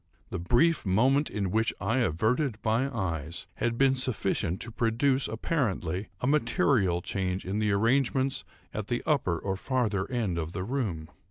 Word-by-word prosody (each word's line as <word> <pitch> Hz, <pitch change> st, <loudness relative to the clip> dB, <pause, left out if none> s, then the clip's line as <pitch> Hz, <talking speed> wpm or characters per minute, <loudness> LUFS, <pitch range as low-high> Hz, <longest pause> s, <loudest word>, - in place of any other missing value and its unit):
The -, -, -3 dB
brief 125 Hz, -, +3 dB
moment 130 Hz, +10 st, +3 dB
in 100 Hz, -3 st, -2 dB
which 110 Hz, +2 st, +2 dB
I 130 Hz, -, 0 dB
averted 115 Hz, -, +1 dB
my 115 Hz, +5 st, +2 dB
eyes 85 Hz, -, -3 dB
had 115 Hz, 0 st, -1 dB
been 135 Hz, 0 st, +4 dB
sufficient 110 Hz, -8 st, 0 dB
to 120 Hz, -, -6 dB
produce, 125 Hz, +4 st, +1 dB
apparently, 105 Hz, -, -2 dB
a -, -, -1 dB
material 115 Hz, -, +2 dB
change 95 Hz, -1 st, -2 dB
in 95 Hz, +3 st, -2 dB
the 105 Hz, -1 st, +1 dB
arrangements 130 Hz, +5 st, +2 dB, 0.3 s
at 105 Hz, -1 st, -4 dB
the 120 Hz, -, -2 dB
upper 130 Hz, -, +1 dB
or 95 Hz, +3 st, -2 dB
farther 105 Hz, -3 st, -1 dB
end 110 Hz, -9 st, -1 dB
of 80 Hz, +1 st, -4 dB
the 95 Hz, -, -3 dB
room. 100 Hz, -, -3 dB
110 Hz, 160 wpm, -28 LUFS, 95-130 Hz, 0.3 s, been